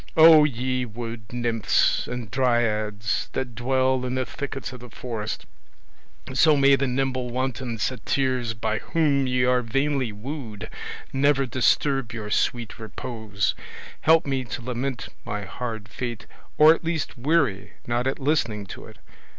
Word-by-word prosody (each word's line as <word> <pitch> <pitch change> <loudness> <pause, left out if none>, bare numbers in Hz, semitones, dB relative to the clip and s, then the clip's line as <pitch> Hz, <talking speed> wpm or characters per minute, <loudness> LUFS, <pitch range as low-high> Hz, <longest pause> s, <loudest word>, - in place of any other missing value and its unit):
Oh, 160 -1 +9
ye 130 -1 -1
wood 115 -1 -7
nymphs 120 -3 +1
and 125 -4 -5
dryads, 110 -4 0
that 125 -3 -3
dwell 130 +2 +1
in 125 0 -2
the 130 0 0
thickets 135 -1 -5
of 125 - -9
the 125 0 -11
forest, 110 -1 -5 0.9
so 150 +3 +5
may 140 0 +6
the 135 0 0
nimble 130 -1 -1
wanton 130 -1 -2
satyrs 125 +1 -1
by 110 0 -1
whom 145 -5 +1
ye 125 0 +2
are 125 0 +3
vainly 135 +1 0
wooed 110 -1 -7 0.4
never 135 0 +3
disturb 130 0 +1
your 105 -2 -5
sweet 120 0 0
repose, 110 -2 -3 0.5
help 160 +1 +5
me 135 -2 -1
to 120 +2 -6
lament 125 +1 -3
my 105 0 -4
hard 110 0 -5
fate 115 -1 -5 0.3
or 155 +1 +9
at 165 - -6
least 160 -4 -2
weary 125 - +1
not 120 +2 0
at 135 - -1
listening 125 -8 0
to - - -9
it! - - -14
125 Hz, 145 wpm, -25 LUFS, 115-135 Hz, 0.9 s, Oh